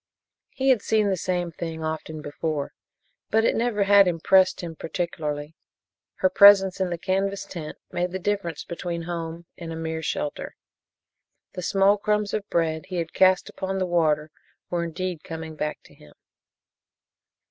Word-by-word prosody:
He 270 0 0
had 250 -5 +4
seen 215 -1 +2
the - - +2
same 180 -1 -2
thing 165 -1 -5
often 155 -1 -4
before, 145 0 -3 0.6
but 225 +1 +3
it - - +2
never 225 -3 +1
had 200 -1 +6
impressed 185 +2 +3
him 170 -2 -6
particularly. 155 -3 -4 0.6
Her 280 - +2
presence 200 -5 +7
in 185 - +1
the 170 - -3
canvas 195 +2 -1
tent 155 -4 -7
made 180 0 -1
the 190 - -2
difference 190 -4 -2
between 170 0 -5
home 170 0 -5
and 165 -2 -6
a - - -5
mere 160 0 -3
shelter. 150 -2 -3 1.0
The 180 - -5
small 195 +3 +3
crumbs 210 0 0
of 210 -1 -3
bread 160 -2 0
he 185 - -6
had 165 -2 -3
cast 185 0 +4
upon 190 0 -4
the 185 - 0
water 155 -3 +1 0.4
were 175 -1 0
indeed 170 0 -4
coming 160 -1 -7
back 150 0 -4
to - - -18
him. 75 - -18
175 Hz, 160 wpm, -25 LUFS, 160-195 Hz, 1.0 s, presence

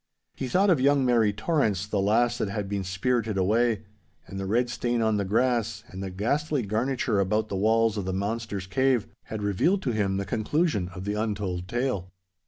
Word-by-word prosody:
He 130 - -4
thought 190 +9 +3
of 155 -7 +3
young 140 0 +4
Mary 115 -4 +3
Torrance, 105 - 0
the 105 -1 -1
lass 120 +4 +2
that 100 - -1
had 100 0 -3
been 100 -1 -2
spirited 110 +3 -1
away. 110 +3 +2 0.4
And 95 - -7
the 95 - -3
red 120 +5 +2
stain 120 0 -1
on 110 -2 +2
the 100 - 0
grass, 115 0 0
and 95 - -7
the 95 - -4
ghastly 135 - -1
garniture 110 +1 0
about 105 +3 +1
the - - -3
walls 110 +2 +2
of 100 - -2
the 95 - -1
monster's 100 0 -3
cave, 130 +3 +1 0.2
had 110 -1 -5
revealed 160 - +1
to 125 - 0
him 100 -3 0
the 100 - -2
conclusion 110 - 0
of 95 +1 -6
the 105 - -1
untold 100 -4 -2
tale. 120 -6 -2
110 Hz, 195 wpm, -26 LUFS, 100-120 Hz, 0.4 s, young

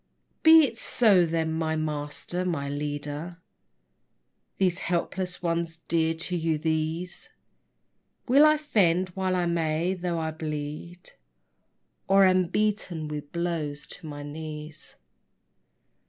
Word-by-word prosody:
Be 320 0 +8
it 230 -4 -5
so 200 -9 +4
then, 160 -1 -1
my 160 0 -1
master, 155 +3 -3
my 160 -6 -2
leader: 145 +3 -4 1.2
These 185 -2 +1
helpless 180 +1 -2
ones, 165 -1 -1
dear 165 -1 +1
to 180 +2 -3
you, 165 -2 0
these 160 +3 -3 1.0
Will 275 +4 +6
I 305 0 +6
fend 185 - +2
while 185 0 -1
I 180 -1 +1
may, 170 +1 0
though 175 -2 -3
I 160 -1 -2
bleed, 155 +2 -6 1.0
or 195 0 +6
Am 185 -1 +4
beaten 185 -5 -1
with 150 -1 -6
blows 165 -4 -3
to 165 - -9
my 145 -1 -7
knees. 150 +1 -7
165 Hz, 120 wpm, -27 LUFS, 155-180 Hz, 1.2 s, Be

